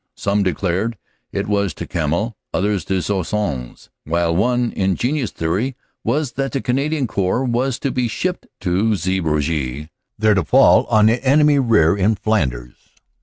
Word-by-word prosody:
Some 100 Hz, +1 st, 0 dB
declared 95 Hz, +4 st, -1 dB, 0.3 s
it -, -, -2 dB
was 100 Hz, -5 st, 0 dB
to -, -, -6 dB
Kemmel, 85 Hz, +8 st, -1 dB, 0.2 s
others 100 Hz, -2 st, 0 dB
to 95 Hz, -2 st, -1 dB
Sois 95 Hz, +2 st, 0 dB
sons; 75 Hz, -13 st, -4 dB
while 85 Hz, +1 st, 0 dB
one 120 Hz, +4 st, +1 dB
ingenious 120 Hz, +8 st, 0 dB
theory 100 Hz, +11 st, -2 dB, 0.3 s
was 140 Hz, +3 st, 0 dB
that 135 Hz, -2 st, -3 dB
the 135 Hz, -, 0 dB
Canadian 140 Hz, +3 st, 0 dB
Corps 100 Hz, +3 st, 0 dB
was 125 Hz, +1 st, 0 dB
to 140 Hz, -, -2 dB
be 125 Hz, -1 st, 0 dB
shipped 180 Hz, +10 st, -3 dB
to 100 Hz, +4 st, +1 dB
Zeebrugge 75 Hz, -6 st, -1 dB, 0.3 s
there 110 Hz, 0 st, +3 dB
to 95 Hz, -3 st, +1 dB
fall -, -, +5 dB
on 105 Hz, -1 st, +4 dB
the 115 Hz, +4 st, +2 dB
enemy 145 Hz, +1 st, +4 dB
rear 105 Hz, -10 st, +3 dB
in 100 Hz, +3 st, +2 dB
Flanders. 65 Hz, -, -1 dB
105 Hz, 155 wpm, -19 LUFS, 85-120 Hz, 0.3 s, fall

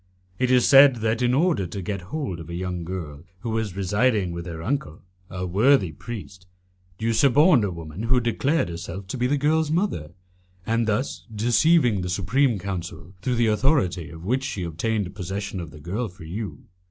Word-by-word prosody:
It 125 Hz, -1 st, +1 dB
is 125 Hz, -1 st, +4 dB
said 135 Hz, -1 st, +8 dB
that, 115 Hz, +2 st, +1 dB
in 125 Hz, +1 st, +3 dB
order 155 Hz, -, +2 dB
to 100 Hz, -, -6 dB
get 100 Hz, +1 st, -4 dB
hold 105 Hz, -, -3 dB
of 80 Hz, 0 st, -9 dB
a 85 Hz, -, -5 dB
young 90 Hz, -1 st, -3 dB
girl 80 Hz, -4 st, -6 dB, 0.2 s
who 115 Hz, -, -3 dB
was 110 Hz, -4 st, -2 dB
residing 100 Hz, 0 st, +1 dB
with 85 Hz, +1 st, -6 dB
her 80 Hz, -2 st, -6 dB
uncle 100 Hz, -, -3 dB, 0.3 s
a 90 Hz, 0 st, -4 dB
worthy 100 Hz, -, +3 dB
priest, 95 Hz, -, -9 dB, 0.5 s
you 115 Hz, +2 st, 0 dB
suborned 140 Hz, -, +5 dB
a 100 Hz, -, 0 dB
woman 85 Hz, +1 st, -7 dB
who 125 Hz, +3 st, +2 dB
declared 130 Hz, -, 0 dB
herself 85 Hz, +3 st, -6 dB
to 130 Hz, -, -3 dB
be 125 Hz, -, +2 dB
the 145 Hz, +3 st, +1 dB
girl's 155 Hz, +2 st, +2 dB
mother, 165 Hz, -, -1 dB, 0.6 s
and 115 Hz, 0 st, +1 dB
thus 110 Hz, +5 st, -2 dB
deceived 120 Hz, -, +3 dB
the 90 Hz, -, -3 dB
Supreme 110 Hz, +7 st, +1 dB
Council, 90 Hz, -2 st, -6 dB
through 125 Hz, +3 st, 0 dB
the 120 Hz, 0 st, +2 dB
authority 105 Hz, -, +1 dB
of 80 Hz, +1 st, -10 dB
which 130 Hz, +6 st, 0 dB
she 120 Hz, -9 st, -3 dB
obtained 95 Hz, +4 st, -2 dB
possession 95 Hz, 0 st, -4 dB
of 85 Hz, -3 st, -6 dB
the 75 Hz, +1 st, -13 dB
girl 100 Hz, +10 st, -3 dB
for 90 Hz, 0 st, -14 dB
you. 100 Hz, +6 st, -6 dB
105 Hz, 190 wpm, -24 LUFS, 90-125 Hz, 0.6 s, said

